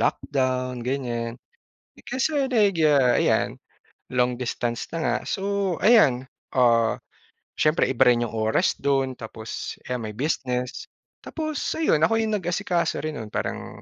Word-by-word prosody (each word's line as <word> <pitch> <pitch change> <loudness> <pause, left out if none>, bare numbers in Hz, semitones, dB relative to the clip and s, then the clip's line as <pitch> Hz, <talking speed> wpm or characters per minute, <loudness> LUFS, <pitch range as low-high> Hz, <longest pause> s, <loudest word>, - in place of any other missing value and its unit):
lockdown 130 -1 -1
ganiyan. 120 -2 -3 0.7
Kasi 280 +2 0
nagya 160 - +3
ayan, - - +1 0.6
long 125 0 +2
distance 120 -1 -3
na 165 - -3
nga, - - +1
so 195 -2 -1
ayan, 170 - +5 0.3
ah, 115 -3 +4 0.6
siyempre 155 +1 +3
iba 130 -1 +4
rin 120 -1 +3
yung 115 - -7
oras 110 0 +1
dun, 135 -1 +1
tapos 110 -1 -7
ayan 125 -1 -2
may 105 - -9
business. 125 -3 -2 0.4
Tapos 310 -2 -3 0.2
ayun, 315 - +2
ako 225 - -1
yung 215 -1 0
nag-asikaso 175 -1 -1
rin 155 -1 -3
nun. 110 - -6
Parang, - - -4
130 Hz, 130 wpm, -24 LUFS, 120-180 Hz, 0.7 s, ayan